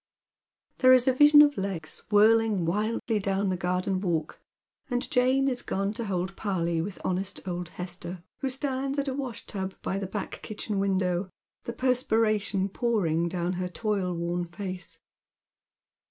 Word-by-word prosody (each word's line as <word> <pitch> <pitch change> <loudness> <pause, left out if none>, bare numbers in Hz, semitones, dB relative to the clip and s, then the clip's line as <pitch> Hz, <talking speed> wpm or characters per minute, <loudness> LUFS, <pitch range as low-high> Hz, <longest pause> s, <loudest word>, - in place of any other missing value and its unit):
There 255 0 +7
is 255 0 +5
a 260 - +5
vision 295 +2 +8
of 290 -5 +2
legs 185 -5 -4
whirling 215 -2 +4
wildly 215 +4 0
down 195 0 0
the - - 0
garden 180 +1 -1
walk, 165 -5 -2 0.5
and 245 -1 0
Jane 260 +2 +3
is 250 -2 0
gone 195 +1 -2
to 230 +1 -4
hold 190 -1 -2
parley 170 -5 -1
with 190 +3 -6
honest 190 +2 -2
old 175 -1 -3
Hester, 175 0 -6 0.2
who 270 - -1
stands 270 +1 -2
at 280 0 0
a 265 - -1
wash 260 -4 -5
tub 190 -1 -4
by 195 - -1
the 195 - -3
back 210 +2 -5
kitchen 210 -1 -3
wandow, 185 -1 0 0.4
the 235 - -4
per 255 +1 +2
spiration 215 -5 +1
pouring 170 -9 +1
down 175 0 -1
her 180 - -1
toilworn 180 -4 -2
face. 180 0 -5
195 Hz, 155 wpm, -27 LUFS, 180-235 Hz, 0.5 s, vision